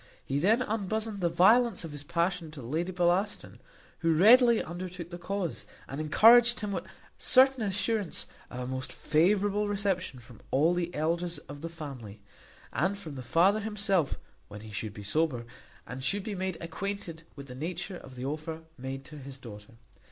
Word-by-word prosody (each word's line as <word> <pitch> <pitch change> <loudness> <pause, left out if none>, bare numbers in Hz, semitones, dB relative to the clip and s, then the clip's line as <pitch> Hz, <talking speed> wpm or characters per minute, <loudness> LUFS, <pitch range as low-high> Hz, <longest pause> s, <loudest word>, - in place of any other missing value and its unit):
He 135 +1 -1
then 220 - +3
unbosomed 215 -1 -2
the 170 - +2
violence 220 +7 +4
of 165 - -6
his 145 -1 -6
passion 170 +2 -1
to 150 -2 -9
Lady 160 +9 -2
Bellaston, 180 +3 0 0.4
who 165 -1 +2
readily 235 +6 +7
undertook 175 0 -7
the 175 - -7
cause, 190 -2 -3 0.2
and 135 +3 -5
encouraged 235 +10 +6
him 210 -1 -3
with 185 -2 -3 0.3
certain 265 -1 +5
assurance 205 -1 0 0.2
of 125 - -6
a - - -3
most 130 +1 -4
favourable 200 +6 +2
reception 195 -8 -1
from 115 -2 -15
all 155 +6 +3
the 175 -1 -1
elders 170 +2 -1
of 145 0 -9
the 165 - -4
family, 135 -11 -8 0.5
and 190 +5 0
from 165 -7 -8
the 130 - -6
father 175 - +3
himself 200 -7 0 0.3
when 105 0 -10
he 110 0 -10
should 105 0 -4
be 105 - -8
sober, 125 +1 0 0.4
and 130 +2 -7
should 195 +8 0
be 215 - -4
made 185 -2 -3
acquainted 170 -1 -5
with 140 -1 -9
the 125 - -10
nature 175 +7 -4
of 130 - -12
the 125 +1 -5
offer 155 +3 -4 0.2
made 135 +1 -6
to 150 0 -10
his 135 0 -9
daughter. 105 -4 -11
170 Hz, 175 wpm, -29 LUFS, 140-200 Hz, 0.5 s, readily